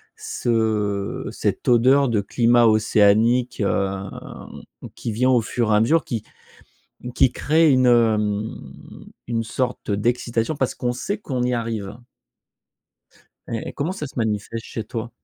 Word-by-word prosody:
ce 105 -4 -1
cette - - -3
odeur 130 +3 +4
de 110 -3 +1
climat 120 +3 +3
océanique, 110 +3 +3
hem, 100 -1 -1 0.9
qui 115 - -4
vient, 125 +4 +1
au 125 -2 +4
fur 115 0 -1
et - - +5
à - - +4
mesure, 155 +7 +3
qui 115 -3 -4 0.9
qui 130 - +4
crée 155 +3 +3
une, 130 -1 +4
hem, 110 -3 +2 0.8
une 115 -1 -1
sorte 125 +2 -3
d'excitation, 115 +5 -1
parce 130 -2 -1
qu'on 125 - -2
sait 200 - -3
qu'on 130 - -3
y 125 0 0
arrive. 110 -3 -4 1.5
Et 115 - -4
et - - -10
comment 150 +5 -2
ça 150 -6 -5
se - - -17
manifeste 110 0 -2
chez 115 - -5
toi? 115 +1 -5
115 Hz, 140 wpm, -22 LUFS, 110-125 Hz, 1.5 s, et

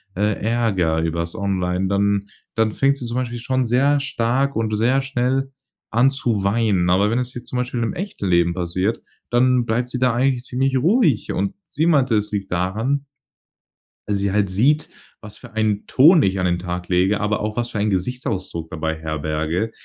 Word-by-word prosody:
äh, 105 +1 0
ärgere 100 -8 +1
übers 85 +1 -2
online, 95 -1 -1
dann 100 0 +1 0.3
dann 110 -1 +2
fängt 140 +4 +2
sie 125 - -6
zum 120 +1 -4
Beispiel 120 -2 -3
schon 130 +1 0
sehr 140 +5 +3
stark 135 +1 0
und 110 -1 0
sehr 125 +5 +2
schnell 135 0 -1 0.4
an 120 +4 +4
zu 120 -7 -1
weinen. 100 -4 +1
Aber 100 +3 +3
wenn 115 - 0
es 125 0 -4
jetzt 120 0 -9
zum 125 - -4
Beispiel 125 -1 -2
im 115 - -1
echten 185 - -4
Leben 85 -1 +3
passiert, 90 +5 -2 0.3
dann 125 0 +3
bleibt 120 +2 -1
sie 125 - -4
da 125 -2 +2
eigentlich 125 0 +1
ziemlich 130 +1 -1
ruhig. 165 - +2
Und 100 +1 -1
sie 160 - -2
meinte, 135 -8 +3
es 105 +1 -2
liegt 100 -3 -4
daran 110 +11 -1 1.0
weil 105 - 0
sie 100 0 0
halt 100 -1 +1
sieht, 140 +11 +2 0.3
was 105 -1 -10
für - - -14
einen 110 -2 0
Ton 155 +5 +6
ich 95 0 +1
an 90 - 0
den 90 0 +1
Tag 90 0 -5
lege, 95 +3 +2
aber 105 +1 0
auch 105 +2 -3
was 120 0 -1
für 105 - -4
einen 105 +1 +1
Gesichtsausdruck 95 -5 -3
dabei 80 0 -3
herberge. 80 +6 -2
110 Hz, 190 wpm, -21 LUFS, 95-125 Hz, 1.0 s, Ton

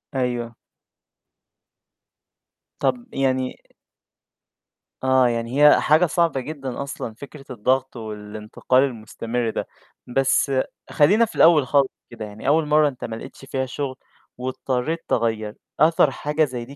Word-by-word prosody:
أيوه. 120 -2 -2 2.2
طَب 240 -1 0
يعني 130 -1 +1
أ - - -21 1.3
آه، 130 -1 +4
يعني 120 +3 -1
هي - - +7
حاجة 155 +4 +4
صعبة 165 -4 +1
جدًا 135 -1 -5
أصلًا، 135 -4 -6
فكرة 140 +4 -12
الضغط 130 +3 0
والإنتقال 110 +3 -1
المُستمر 115 -1 -3
ده، - - -3 0.4
بس 135 +2 +2 0.4
خلّينا 205 +11 +4
في - - -12
الأول 155 -5 +6
خالص 140 -1 +3 0.2
كده 115 -2 -7
يعني 105 +4 -8
أول 155 +2 +3
مرّة 150 0 +4
أنت 130 -3 -6
ما 110 - -5
لقيتش 125 - -10
فيها 130 0 -2
شُغل 130 +1 -4 0.4
واضطرّيت 130 +4 -2
تغيّر، 110 -2 -1 0.2
أثر 155 -1 +4
حاجة 150 +3 0
زي 125 -4 -6
دي 140 +3 -12
130 Hz, 130 wpm, -23 LUFS, 120-145 Hz, 2.2 s, هي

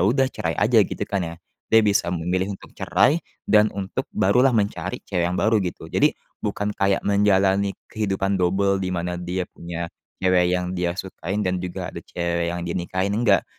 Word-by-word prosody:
udah 120 +9 +3
cerai 80 -1 -2
aja, 110 +2 +4
gitu, 100 +1 -1
kan, 100 -1 -2
ya. 85 - -8 0.3
Dia 110 -1 +5
bisa 100 -4 +2
memilih 90 +3 -1
untuk - - -16
cerai 125 - +2 0.2
dan 105 0 +5
untuk 95 -2 -4
barulah 125 +8 +4
mencari 95 -3 -2
cewek 90 -3 0
yang 90 - -2
baru, 110 0 +3
gitu. 90 -2 -5
Jadi - - +3 0.2
bukan 105 0 -2
kayak 100 -1 +1
menjalani 100 -1 +3 0.2
kehidupan 95 -2 0
dobel, 95 +2 +2
di 95 - -2
mana 90 -1 -2
dia 90 +1 -2
punya 85 -1 -7 0.3
cewek 90 -1 +4
yang 90 0 -3
dia 90 -1 -1
sukain 95 +2 -3
dan 90 -1 0
juga 90 -1 -5
ada - - -6
cewek 85 -1 -2
yang 85 0 -3
dinikahin, 95 +3 -2
enggak. 105 -4 +3
95 Hz, 175 wpm, -23 LUFS, 90-100 Hz, 0.3 s, Dia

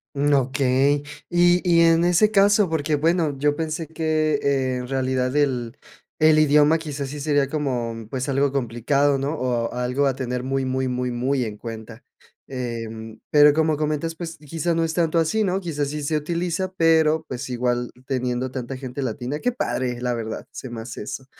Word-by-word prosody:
Mm, 145 +1 +1
okey. 135 +1 +2 0.3
Y 175 0 +4
y 170 -1 +5
en 165 0 +4
ese 180 +5 +4
caso, 200 -1 +4
porque, 155 -1 0
bueno, 160 -1 +1
yo 145 +1 +2
pensé 160 0 -3
que, 155 -1 0
eh, 135 -2 +1
en 125 0 -5
realidad 130 -1 -1
el 125 -4 0 0.4
el 155 0 +5
idioma 150 +1 +5
quizás 145 -4 -5
sí 150 +1 -6
sería 145 -2 +1
como, 120 -7 -3
pues, 130 +1 -3
algo 140 +1 +2
complicado, 135 +2 +1
¿no? 140 +3 -2
O 125 -5 -1
algo 125 +3 0
a 135 - 0
tener 125 -2 -3
muy, 135 +1 -1
muy, 130 0 -1
muy, 125 0 -2
muy 130 +2 0
en 105 -2 -6
cuenta. 115 +1 -8 0.5
Em, 115 -3 -6
pero, 150 0 +7
como 155 0 +1
comentas, 155 +2 -2
pues, 165 0 -6
quizá 165 +3 -2
no 165 - +1
es 160 -1 -1
tanto 165 -1 +1
así, 215 +7 +1
¿no? 190 0 0
Quizás 150 -6 -3
sí 150 0 -4
se 155 +2 0
utiliza, 170 +4 -2
pero, 160 -1 +3
pues, 130 +1 -5
igual 120 0 -1
teniendo 125 -1 -2
tanta 130 0 -5
gente 130 +1 -6
latina, 130 +3 -3
¡qué 250 +9 0
padre!, 125 - -2
la 125 0 -1
verdad, 110 -1 -5
se 130 - -8
me 115 -1 -6
hace 115 -1 -7
eso. 130 +5 -7
140 Hz, 185 wpm, -23 LUFS, 125-160 Hz, 0.5 s, pero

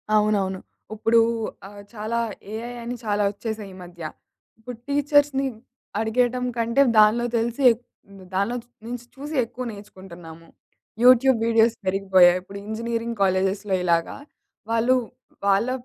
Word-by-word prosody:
అవునవును. 200 -3 +1 0.3
ఉప్పుడూ 225 +2 +3 0.5
ఆహ్, 205 0 -12
చాలా 220 +2 -2 0.3
ఏఐ 235 +2 -5
అని 245 +1 -4
చాలా 205 -1 +1
ఒచ్చేసాయి 215 -1 -6
ఈ - - -12
మధ్య. 175 -1 -13 0.6
ఇప్పుడు 240 +1 -9
టీచర్స్‌ని 285 -1 +2 0.5
అడిగేయటంకంటే, 245 +1 +1 0.2
దానిలో 215 +3 +5
తెలిసి 235 +3 -2
ఎక్ 230 +2 -5 0.3
హ్మ్. 195 -1 -14
దానిలోంచి 230 +5 -2 0.2
నించి 245 0 -6
చూసి 295 +3 -7
ఎక్కువ 250 +2 -7
నేర్చుకుంటున్నాము. 175 -5 -12 0.6
యూట్యూబ్ 255 0 +6
వీడియోస్ 230 0 +3
పెరిగిపోయాయి, 185 -2 +4
ఇప్పుడు 195 +2 -10
ఇంజినీరింగ్ 230 +1 -3
కాలేజెస్‌లో 190 +1 +1
ఇలాగా, 170 -1 0 0.5
వాళ్ళు 230 +3 +3 0.5
వాళ్ళ 200 +5 +3
220 Hz, 115 wpm, -23 LUFS, 195-240 Hz, 0.6 s, యూట్యూబ్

